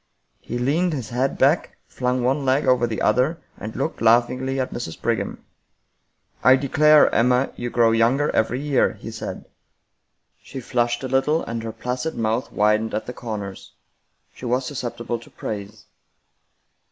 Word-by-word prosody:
He 120 - -5
leaned 155 +8 +1
his 130 -6 -4
head 130 +3 -1
back, 145 +6 +2
flung 125 0 -1
one 135 +3 +1
leg 135 +2 +2
over 125 -2 +3
the 110 - -3
other, 130 +9 +2 0.2
and 110 +1 -8
looked 140 +5 -3
laughingly 125 +3 +2
at 130 - -2
Mrs. 100 -9 -6
Brigham. - - -2 0.5
" - - -38
I 130 +1 +7
declare, 150 +3 +4
Emma, 125 +3 +3
you 120 - -4
grow 115 -1 +3
younger 120 +6 +2
every 115 +3 +1
year," 145 -2 +1
he - - -9
said. - - -6 1.0
She 135 +1 -8
flushed 120 0 -1
a - - -2
little, 135 +5 +1
and 115 0 -4
her 115 0 -5
placid 125 +6 -4
mouth 115 +2 -1
widened 105 +1 +1
at 110 - -3
the 125 - -6
corners. 105 -6 -7 0.6
She - - -10
was 125 +2 0
susceptible 120 -3 -4
to 115 - -16
praise. 105 0 -7
125 Hz, 160 wpm, -22 LUFS, 115-135 Hz, 1.0 s, I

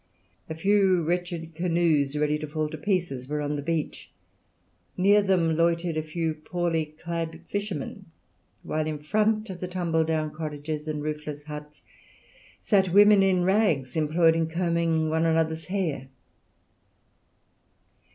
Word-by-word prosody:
A 160 - -4
few 190 0 +3
wretched 170 -1 -3
canoes, 165 -4 +1
ready 150 0 +1
to 155 - -5
fall 155 0 -2
to 155 - -6
pieces, 170 -8 -1
were 150 +1 -2
on 145 0 -2
the 145 - -3
beach; 160 +1 -3 0.9
near 200 +3 +5
them 180 -5 +2
loitered 170 0 +1
a 155 - 0
few 160 +1 -2
poorly 165 +1 -2
clad 165 -1 -4
fishermen; 200 -8 -4 0.6
while 155 0 -2
in 155 -1 -2
front 215 +7 0
of 180 - -8
the 180 - -4
tumble 170 -3 0
down 155 -1 -1
cottages 155 0 -5
and 150 -1 -3
roofless 150 -1 -5
huts 150 0 -9 0.8
sat 190 -4 +2
women 205 +1 +7
in 185 -2 +3
rags 180 - +1
employed 160 +1 +3
in 165 -1 +1
combing 165 -2 0
one 160 +1 +2
another's 160 0 0
hair. 175 -9 -2
165 Hz, 140 wpm, -26 LUFS, 155-180 Hz, 0.9 s, women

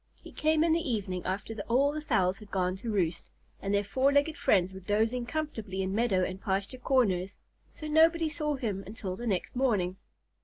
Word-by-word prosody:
He - - -11
came 310 0 +2
in 330 -1 +3
the 330 - +3
evening 190 -5 -2
after 200 +4 -3
all 270 +5 +3
the 305 +1 -4
fowls 195 -9 +1
had 210 -2 -13
gone 185 -1 0
to 230 +4 -6
roost, 175 -5 -1 0.3
and 195 - -2
their 200 0 +2
four 260 +7 +2
legged 285 +2 +2
friends 190 -1 +2
were 190 - -8
dozing 220 +5 0
comfortably 220 -11 -3
in 190 0 -2
meadow 205 -4 +2
and 185 +1 -4
pasture 200 +6 -2
corners, 200 -8 +1 0.3
so 310 - -8
nobody 325 +2 +4
saw 300 -1 -1
him 210 -7 -3
until 200 -3 -5
the 240 +5 -5
next 195 +1 -1
morning. 205 -8 +1
215 Hz, 195 wpm, -30 LUFS, 190-275 Hz, 0.3 s, nobody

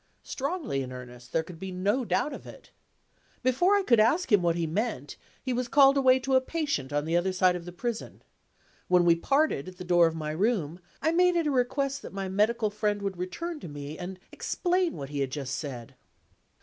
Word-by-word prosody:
Strongly 280 - -3
in 130 -1 -6
earnest; 125 -1 -10
there 160 - +1
could 165 0 -11
be 190 +1 -5
no 200 +8 0
doubt 285 +5 0
of - - -9
it. - - -13 0.7
Before 305 +11 +3
I 405 - +2
could 235 - +4
ask 255 +9 +3
him 205 -3 +6
what 170 -1 +2
he 170 -1 -1
meant, 165 - -3 0.3
he 255 - -1
was 250 0 -1
called 275 +1 +6
away 260 -2 +5
to 265 +2 -1
a 260 - +5
patient 280 - -2
on 145 0 0
the 165 +1 0
other 175 +2 +2
side 185 -1 +3
of 175 -1 -6
the 175 - -7
prison. 235 +5 -5 0.6
When 180 -1 +4
we 170 -1 +6
parted 275 - +1
at 185 -1 -10
the 180 - -7
door 175 -1 +5
of 165 - -3
my 155 -1 -3
room, 180 -2 0 0.2
I 320 - +3
made 360 +1 +4
it 335 -2 +1
a 295 - +1
request 275 +2 0
that - - -10
my 195 -1 -3
medical 210 +3 +1
friend 210 -1 -1
would 195 -3 -3
return 320 - -4
to - - -8
me 145 0 -7
and 180 +2 -7
explain 360 -1 0
what 135 -1 -6
he 145 -1 -4
had 135 -1 0
just 135 -1 -4
said. 125 -6 -6
195 Hz, 220 wpm, -28 LUFS, 165-265 Hz, 0.7 s, him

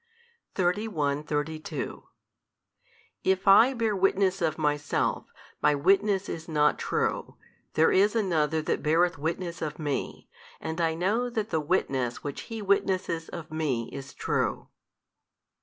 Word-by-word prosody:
31, 175 -7 0
32 150 +1 -4 1.2
If 190 0 +1
I 230 +7 +7
bear 225 -3 0
witness 195 0 +2
of 155 -2 0
Myself, 150 -2 0 0.3
My 150 0 +4
witness 195 +6 +2
is 160 -1 -6
not 150 -1 +2
true: - - -1 0.4
there 160 - +4
is 205 +4 +4
another 160 -7 +1
that - - -1
beareth 165 +1 +2
witness 170 +3 -3
of 155 -2 -3
Me, 145 -3 -3 0.3
and 160 +2 -3
I 165 -1 +1
know 210 +9 0
that 220 -2 -3
the 160 - +1
witness 135 -7 -1
which 145 -1 -6
He 225 -2 -5
witnesseth 190 -4 0
of 160 -2 -8
Me 145 -7 -1
is 135 -1 -8
true. - - -1
165 Hz, 130 wpm, -27 LUFS, 150-195 Hz, 1.2 s, I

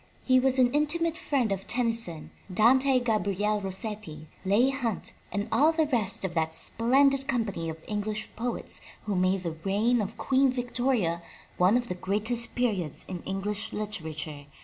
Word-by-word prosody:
He 255 -1 +5
was 265 0 +2
an 250 -1 +4
intimate 320 +3 +2
friend 280 - 0
of 195 0 -3
Tennyson, 230 -9 -1 0.2
Dante 255 +6 +4
Gabriel 210 -3 0
Rossetti, 195 -5 -3 0.2
Leigh 215 +8 +3
Hunt 245 -6 -2 0.2
and 205 +1 -2
all 305 +3 +5
the 320 -1 +2
rest 225 -9 +1
of 180 - -3
that 160 -1 0
splendid 270 +6 +2
company 205 -10 -1
of 160 0 -8
English 215 +1 -2
poets 240 +2 -3 0.2
who 205 - -2
made 185 +1 +1
the 165 -2 -4
reign 220 +5 +2
of 210 +2 -5
Queen 265 0 +3
Victoria 245 -8 0 0.4
one 185 +6 +5
of 245 -1 -2
the - - -2
greatest 215 +6 -2
periods 200 - -1
in 180 -2 -5
English 205 +3 -2
literature. 155 -8 -5
215 Hz, 155 wpm, -28 LUFS, 190-250 Hz, 0.4 s, He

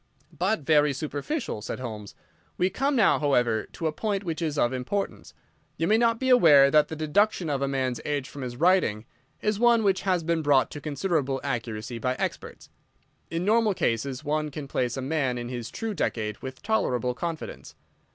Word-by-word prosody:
"But 190 +2 0
very 150 0 +3
superficial," 150 - -4
said - - -5
Holmes. 110 -5 -7 0.4
"We 185 +1 +1
come 275 +7 0
now, 220 -6 +4
however, 120 -6 +1
to 165 - -5
a 160 - +2
point 205 +4 -2
which 165 -2 -4
is 155 -3 -2
of 120 -2 +2
importance. 130 +11 -4 0.4
You 165 - 0
may 220 +3 +4
not 230 -1 +2
be 260 - 0
aware 150 - +7
that 150 0 +5
the 160 - -6
deduction 160 +2 +1
of 140 -1 -1
a 140 - +1
man's 130 -3 -1
age 145 -3 -2
from 145 - -9
his 125 -1 -5
writing 160 - +2 0.4
is 210 -1 0
one 235 -1 +4
which 195 -2 +2
has 185 -3 0
been 165 0 0
brought 145 -3 +3
to 145 - -7
considerable 145 -2 -1
accuracy 115 -3 -4
by 125 +2 -1
experts. - - -5 0.6
In 165 +2 -2
normal 215 -1 +3
cases 130 +3 -1
one 150 +1 -1
can 145 -1 -7
place 125 -1 -1
a 135 - -3
man 135 -3 0
in 120 0 -5
his 120 -2 -5
true 225 -1 -4
decade 110 - -2
with 130 0 -8
tolerable 125 - 0
confidence. 165 +4 -6
150 Hz, 190 wpm, -26 LUFS, 130-190 Hz, 0.6 s, aware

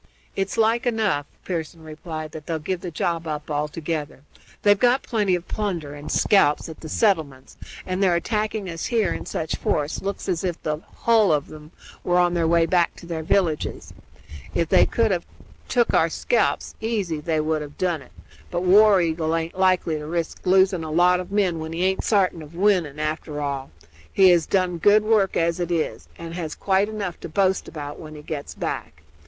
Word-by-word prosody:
"It's 195 0 -2
like 230 +3 +2
enough," 215 -11 0 0.2
Pearson 165 -2 -4
replied, 155 0 -7
"that 155 -1 -10
they'll 165 - -1
give 170 +3 -3
the 180 - -5
job 165 +1 -2
up 150 0 -4
altogether. 150 0 -3 0.4
They've 205 -1 +5
got 250 +3 +3
plenty 205 -5 +1
of 175 0 -6
plunder 175 -9 -3
and 145 0 -7
scalps 170 -8 +3
at 160 - -9
the 160 - -8
settlements, 155 - 0 0.3
and 185 +1 -2
their 185 -3 +4
attacking 215 +2 -1
us 165 -2 -4
here 220 -7 +1
in - - -7
such 160 - -3
force 150 +1 -1
looks 200 +1 -4
as 180 -2 -1
if 175 -3 -2
the 150 0 -2 0.2
hull 225 -5 +4
of 150 -1 -1
'em 155 0 -12 0.3
were 175 0 +2
on 175 -1 +3
their 170 -2 +1
way 170 0 +4
back 175 -1 +2
to - - -12
their 165 -2 -4
villages. 160 -2 -1 0.6
If 165 -1 0
they - - +5
could 225 -2 +1
have 175 -2 0 0.4
tuk 240 -2 +2
our - - +4
scalps - - 0
easy 205 -8 -1
they 155 +1 -1
would 155 0 0
have 145 -1 -9
done 175 -5 0
it; 130 - -16 0.4
but 175 0 -2
War 200 +1 +6
Eagle 160 -1 0
aint 165 0 -2
likely 185 -4 +2
to 150 - -7
risk 170 +2 -4
losing 190 -2 +4
a 160 - -5
lot 180 +3 +4
of 180 +1 -7
men 190 -5 +1
when 160 +1 -5
he 170 +2 -1
aint 190 0 0
sartin 190 -6 +2
of 155 +2 -12
winning, 175 -6 +1
after 155 0 -3
all. 140 -2 -3 0.4
He 190 -1 +6
has 170 -2 +3
done 180 -3 0
good 205 +4 +5
work 215 -3 +2
as 170 +1 +1
it 175 -1 -2
is, 165 -2 -2
and 165 0 -7
has 165 -3 -4
quite 195 +1 +1
enough 200 -5 -4
to - - -7
boast 190 +3 +1
about 145 -2 -7
when 155 -1 -9
he 150 - -10
gets 145 -2 -6
back. 75 0 -5
170 Hz, 200 wpm, -23 LUFS, 155-195 Hz, 0.6 s, War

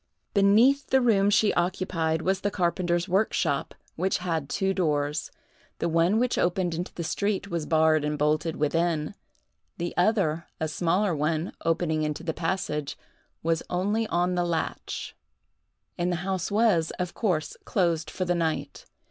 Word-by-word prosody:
Beneath 225 +8 +4
the 265 - +5
room 205 -5 +3
she 210 0 +3
occupied 175 -3 0
was 190 +1 0
the 205 - +1
carpenter's 175 -1 0
workshop, 180 -6 0 0.2
which 185 +3 0
had 165 -5 -2
two 195 -1 0
doors. 150 -4 0 0.5
The 170 - -1
one 170 +5 +3
which 250 +1 +1
opened 175 -1 +1
into 175 +2 -4
the 170 - -3
street 200 +3 -1
was 170 -4 -3
barred 155 -1 +3
and 150 0 -1
bolted 155 +2 +1
within; 160 +2 0 0.6
the 175 0 -3
other, 175 -5 +1
a 160 - 0
smaller 175 +3 +1
one, 155 +3 -1
opening 165 -1 +1
into 150 +1 -2
the 165 -1 -2
passage, 155 -4 -2 0.5
was 165 0 +1
only 205 +5 0
on 180 0 +1
the 175 0 +1
latch; 170 -2 -3 0.8
and 175 +1 +1
the - - 0
house 190 -2 -1
was, 205 -6 +3
of 180 -1 -3
course, 180 -9 -1
closed 170 -5 0
for 185 - -3
the 175 - +1
night. 165 -2 -2
175 Hz, 155 wpm, -27 LUFS, 160-195 Hz, 0.8 s, the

